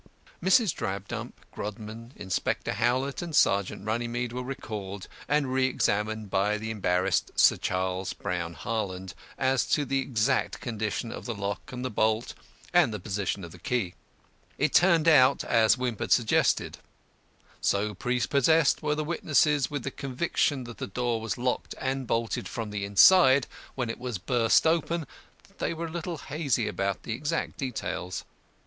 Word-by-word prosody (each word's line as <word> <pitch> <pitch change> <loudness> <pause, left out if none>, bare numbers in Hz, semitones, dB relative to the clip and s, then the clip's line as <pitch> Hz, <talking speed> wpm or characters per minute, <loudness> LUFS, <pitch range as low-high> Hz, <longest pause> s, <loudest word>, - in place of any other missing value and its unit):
Mrs. 190 -2 +4
Drabdump, 100 -4 -4 0.2
Grodman, 110 +3 -7
Inspector 95 -3 -2
Howlett, 130 +6 0
and 170 -3 -4
Sergeant 100 -3 +2
Runnymede 120 +2 -2
were 125 - -3
recalled 105 -7 -6 0.2
and 150 0 +2
reëxammed 110 -5 0
by 100 +2 +2
the 110 +1 -4
embarrassed 95 -3 +1
Sir - - +6
Charles 95 0 -2
Brown 85 -2 -4
Harland 95 -2 -4 0.2
as 130 -1 +2
to 150 -2 +1
the 135 +1 0
exact 130 0 0
condition 110 0 -3
of - - -7
the 120 - -3
lock 100 -1 -4
and 125 0 -5
the 130 - -2
bolt 110 +3 +1 0.4
and - - +5
the 105 - -4
position 100 0 -3
of 85 - -8
the 90 - -13
key. 115 -5 -1 0.6
It - - +1
turned 170 -3 +5
out 140 -4 +6
as 115 +1 +4
Wimp 125 -4 -2
had - - -3
suggested; 115 -3 +2 0.8
so 105 +1 +1
prepossessed 130 - +2
were 150 -1 0
the 155 - -1
witnesses 150 -3 +2
with 145 -4 -4
the 135 - -3
conviction 135 +1 -1
that 120 -1 -10
the - - -3
door 120 +2 -1
was 110 -1 -3
locked 125 +1 -2
and 135 -1 -2
bolted 115 0 -1
from 115 -3 -5
the 100 -1 -3
inside 130 - +6 0.3
when 125 -3 -1
it - - -9
was 125 -3 -3
burst 115 - +3
open 165 0 +1 0.4
that - - -27
they 170 - -1
were 165 +1 -4
a 165 - -6
little 170 0 -4
hazy 145 -6 -1
about 100 0 -2
the 115 - -3
exact 145 +6 -2
details. 95 -8 -4
120 Hz, 160 wpm, -28 LUFS, 105-135 Hz, 0.8 s, Sir